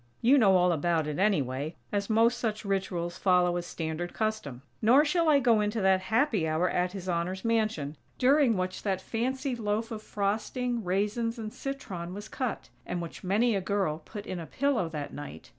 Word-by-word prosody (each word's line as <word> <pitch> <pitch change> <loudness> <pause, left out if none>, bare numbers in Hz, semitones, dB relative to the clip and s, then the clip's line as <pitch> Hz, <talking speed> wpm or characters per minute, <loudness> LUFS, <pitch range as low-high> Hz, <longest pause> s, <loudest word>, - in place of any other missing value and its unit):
You 270 +4 +5
know 195 -5 +6
all 180 0 +4
about 165 0 +1
it, 150 +2 -3
anyway, 150 -7 0 0.2
as 200 0 -1
most 225 +2 +3
such 215 -2 -2
rituals 185 -3 -2
follow 180 -2 +3
a 175 - 0
standard 170 0 -4
custom. 215 - -2 0.2
Nor 255 +7 +6
shall 330 +1 +2
I 290 -2 +6
go 235 -5 +4
into 210 +2 -1
that 190 -1 +3
happy 220 - +1
hour 160 +3 +1
at 180 +1 0
His 190 -2 -7
Honor's 180 +3 -2
mansion, 215 -10 0 0.2
during 265 -3 +4
which 185 0 -2
that 195 -3 -1
fancy 255 +6 -2
loaf 220 +1 -2
of 220 -1 -5
frosting, 220 +4 -2
raisins 210 +6 -1
and 215 -2 -6
citron 190 -11 -5
was 205 +1 -8
cut; 255 -4 -3
(and 180 - -3
which 170 -1 -7
many 215 +6 +2
a 195 - 0
girl 185 -5 -1
put 205 +3 -8
in 185 - -4
a 165 - -7
pillow 265 -10 0
that 150 -3 -5
night!) 145 - -8
200 Hz, 190 wpm, -29 LUFS, 175-230 Hz, 0.2 s, know